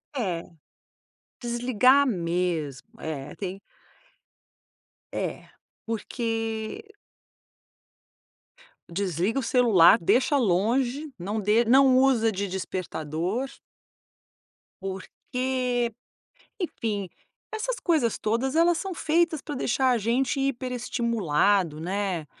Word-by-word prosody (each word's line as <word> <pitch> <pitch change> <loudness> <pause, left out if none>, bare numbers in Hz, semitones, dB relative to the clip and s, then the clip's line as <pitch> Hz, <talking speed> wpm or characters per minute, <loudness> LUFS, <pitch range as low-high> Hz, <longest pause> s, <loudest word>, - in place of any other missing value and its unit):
É, 185 -10 -2 0.9
desligar 250 +3 +3
mesmo, 170 - -1
é 145 -3 -5
tem 195 0 -5 1.6
É, - - -4 0.4
porque 225 - -3 2.0
Desliga 185 - -1
o - - -3
celular, 230 -6 +6
deixa 255 - +3
longe, 245 - +1
não 205 +4 -3
de 210 +3 +3
não 260 +2 +5
usa 255 -4 +4
de 200 0 -3
despertador. 185 - -3 1.4
Porque, 245 +5 -2 0.6
enfim, 215 - -3 0.4
essas 465 +3 -2
coisas 300 - +2
todas 235 +6 -1
elas 335 +1 +4
são 385 +1 -4
feitas 320 -1 +1
pra 295 - -6
deixar 260 0 +1
a 245 - +3
gente 245 +6 0
hiperestimulado, 230 - 0
né? 185 -2 -2
230 Hz, 85 wpm, -26 LUFS, 190-260 Hz, 2.0 s, celular